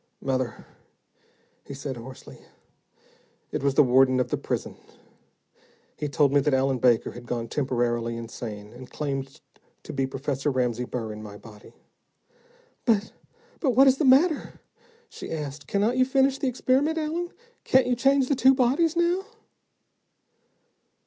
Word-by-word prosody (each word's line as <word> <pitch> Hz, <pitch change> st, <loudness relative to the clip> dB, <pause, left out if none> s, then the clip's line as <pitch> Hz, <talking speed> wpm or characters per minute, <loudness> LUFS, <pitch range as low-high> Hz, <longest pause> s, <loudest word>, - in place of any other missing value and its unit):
"Mother," 130 Hz, -3 st, -3 dB, 1.0 s
he 140 Hz, -, -9 dB
said 135 Hz, -1 st, -5 dB
hoarsely, 120 Hz, +2 st, -11 dB, 1.1 s
"it -, -, -2 dB
was 140 Hz, -1 st, +1 dB
the 150 Hz, -, +7 dB
warden 130 Hz, 0 st, +4 dB
of 125 Hz, -, 0 dB
the -, -, 0 dB
prison. -, -, -4 dB, 1.2 s
He 150 Hz, -, -4 dB
told 140 Hz, -2 st, +2 dB
me 145 Hz, -, +5 dB
that 140 Hz, 0 st, +2 dB
Allen 130 Hz, -1 st, +1 dB
Baker 120 Hz, -2 st, +3 dB
had 120 Hz, 0 st, -11 dB
gone 115 Hz, -1 st, -3 dB
temporarily 120 Hz, -4 st, -1 dB
insane, 110 Hz, -2 st, -8 dB
and 125 Hz, +1 st, -11 dB
claimed 135 Hz, -2 st, -5 dB, 0.4 s
to -, -, -8 dB
be 135 Hz, -1 st, 0 dB
Professor 135 Hz, +1 st, -2 dB
Ramsey 125 Hz, -2 st, -1 dB
Burr 115 Hz, -3 st, -5 dB
in 105 Hz, -, -9 dB
my 105 Hz, -1 st, -9 dB
body." 105 Hz, 0 st, -15 dB, 1.1 s
"But 220 Hz, -3 st, +1 dB, 0.5 s
but 260 Hz, -7 st, +1 dB
what 270 Hz, +2 st, +7 dB
is 265 Hz, 0 st, +4 dB
the -, -, +1 dB
matter?" 285 Hz, +5 st, +3 dB, 0.5 s
she -, -, -9 dB
asked. 145 Hz, -3 st, -6 dB
"Cannot 210 Hz, +5 st, +1 dB
you 255 Hz, -, +4 dB
finish 270 Hz, +1 st, +2 dB
the 280 Hz, -, -1 dB
experiment, 265 Hz, +5 st, +1 dB
Allen? 325 Hz, +3 st, -2 dB, 0.3 s
Can't 260 Hz, 0 st, +4 dB
you 250 Hz, -, +1 dB
change 270 Hz, +1 st, +3 dB
the 285 Hz, -, +1 dB
two 265 Hz, +1 st, +5 dB
bodies 285 Hz, +6 st, +2 dB
now?" 345 Hz, +2 st, +1 dB
140 Hz, 150 wpm, -25 LUFS, -, 1.2 s, the